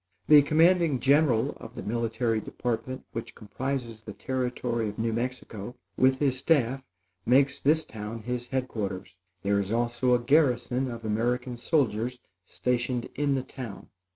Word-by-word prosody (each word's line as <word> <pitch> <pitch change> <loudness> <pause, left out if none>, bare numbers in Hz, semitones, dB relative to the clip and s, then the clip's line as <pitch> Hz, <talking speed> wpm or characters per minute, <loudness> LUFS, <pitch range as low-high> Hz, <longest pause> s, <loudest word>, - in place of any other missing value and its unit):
The 150 -1 +9
commanding 160 -1 +3
general 135 -4 +3
of - - -11
the - - -6
military 115 0 0
department 125 +4 -4
which 115 - -6
comprises 120 0 -4
the 105 -1 -8
Territory 125 -3 -2
of 105 - -9
New 115 0 0
Mexico, 120 -2 -4 0.2
with 130 0 +4
his 135 -2 +1
staff, 135 -3 +2 0.4
makes 135 +2 +3
this 155 +2 +3
town 110 -1 -7
his 125 0 -3
head 130 +1 -1
quarters. 100 -5 -5 0.3
There 100 +1 +2
is 100 0 -3
also 120 +2 +2
a - - +1
garrison 130 -1 +2
of 115 -2 -7
American 120 +3 -1
soldiers 120 -2 0 0.3
stationed 125 -1 -1
in 145 -1 +1
the 130 - -1
town. 120 -7 -9
125 Hz, 150 wpm, -27 LUFS, 115-130 Hz, 0.4 s, The